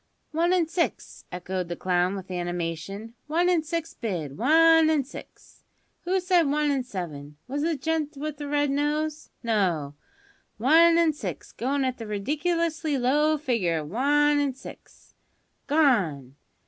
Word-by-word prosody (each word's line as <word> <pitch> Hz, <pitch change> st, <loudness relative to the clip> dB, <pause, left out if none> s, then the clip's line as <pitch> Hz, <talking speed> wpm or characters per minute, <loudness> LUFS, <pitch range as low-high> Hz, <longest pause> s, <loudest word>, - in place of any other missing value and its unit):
"One 335 Hz, +3 st, +1 dB
an' 355 Hz, -3 st, +2 dB
six," 335 Hz, +1 st, -3 dB
echoed 180 Hz, 0 st, -4 dB
the 175 Hz, -, -4 dB
clown 180 Hz, +2 st, 0 dB
with 190 Hz, -1 st, -8 dB
animation; 175 Hz, +4 st, -4 dB
"one 340 Hz, +4 st, +2 dB
an' 350 Hz, -3 st, +3 dB
six 330 Hz, +1 st, -4 dB
bid; 170 Hz, -, -4 dB
one 325 Hz, -, +5 dB
an' 305 Hz, -3 st, +2 dB
six. 265 Hz, -, -13 dB, 0.4 s
Who 375 Hz, +2 st, +1 dB
said 355 Hz, -4 st, +2 dB
one 295 Hz, 0 st, +1 dB
an' 270 Hz, -2 st, 0 dB
seven? 150 Hz, -, -7 dB
Was 280 Hz, +3 st, -3 dB
it -, -, 0 dB
the 335 Hz, -, 0 dB
gent 315 Hz, -2 st, -1 dB
with 300 Hz, +1 st, -4 dB
the 290 Hz, 0 st, -6 dB
red 290 Hz, -1 st, +1 dB
nose? 300 Hz, +2 st, -1 dB
No, 180 Hz, -11 st, 0 dB, 0.6 s
one 325 Hz, +8 st, +5 dB
an' 330 Hz, -2 st, +3 dB
six; 300 Hz, -, -6 dB
goin' 270 Hz, +2 st, -1 dB
at 255 Hz, -1 st, -2 dB
the 225 Hz, -, -6 dB
ridiculously 310 Hz, -, -1 dB
low 295 Hz, +5 st, +2 dB
figure 230 Hz, -, 0 dB
of 150 Hz, -1 st, -5 dB
one 290 Hz, +5 st, +3 dB
an' 280 Hz, -3 st, 0 dB
six -, -, -14 dB, 0.5 s
gone! 195 Hz, -, +2 dB
285 Hz, 155 wpm, -26 LUFS, 190-315 Hz, 0.6 s, one